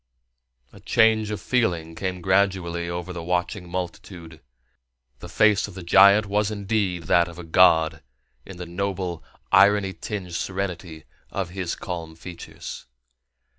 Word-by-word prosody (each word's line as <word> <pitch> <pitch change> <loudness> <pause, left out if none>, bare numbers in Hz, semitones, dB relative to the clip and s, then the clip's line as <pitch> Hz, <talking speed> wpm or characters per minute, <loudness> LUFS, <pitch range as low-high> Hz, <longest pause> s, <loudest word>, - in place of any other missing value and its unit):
A - - -14
change 110 -1 +3
of 105 -1 -3
feeling 90 -9 -1
came 90 +2 -4
gradually 95 -3 +1
over 90 +1 -5
the 85 - -6
watching 90 +2 -2
multitude. 90 -3 -7 0.8
The - - -10
face 105 -1 +3
of 100 - -12
the 95 - -8
giant 100 +4 +6
was 105 +1 0
indeed 100 -4 -1
that 85 +2 +3
of 85 0 -11
a 90 - -8
god 80 -2 +4 0.4
in 95 +4 -11
the 90 - -6
noble, 90 -1 -4 0.3
irony 100 -1 +5
tinged 90 0 -6
serenity 90 -4 -4 0.3
of 95 -3 -4
his 90 -2 -3
calm 85 -3 -6
features. 85 +1 -9
90 Hz, 135 wpm, -24 LUFS, 85-100 Hz, 0.8 s, giant